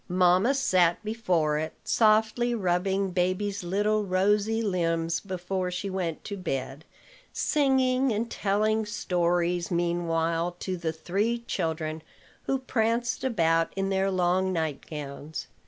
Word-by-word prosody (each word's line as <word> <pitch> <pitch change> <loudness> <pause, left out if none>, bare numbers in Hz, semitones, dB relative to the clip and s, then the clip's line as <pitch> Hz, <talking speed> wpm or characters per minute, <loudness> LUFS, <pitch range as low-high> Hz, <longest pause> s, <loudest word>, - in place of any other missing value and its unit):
Mamma 185 +8 +4
sat 180 -10 +3
before 175 -9 0
it, 155 +1 -4
softly 220 +2 +3
rubbing 190 0 0
baby's 185 +2 -1
little 210 +4 +1
rosy 205 +3 +1
limbs 165 -4 0
before 185 -1 -3
she 180 +2 -4
went 175 -4 -3
to 205 - -5
bed, 135 -3 -4 0.5
singing 265 -3 +2
and 220 +2 -1
telling 215 +2 +1
stories 175 -4 0
meanwhile 170 -1 0
to 185 - -2
the 170 -2 -2
three 200 +9 -1
children 160 -5 -2 0.4
who 270 - +1
pranced 235 -2 -1
about 165 -9 +2
in 195 0 -1
their 195 0 +1
long 185 0 +1
nightgowns. 150 -2 -4
185 Hz, 120 wpm, -27 LUFS, 170-215 Hz, 0.5 s, Mamma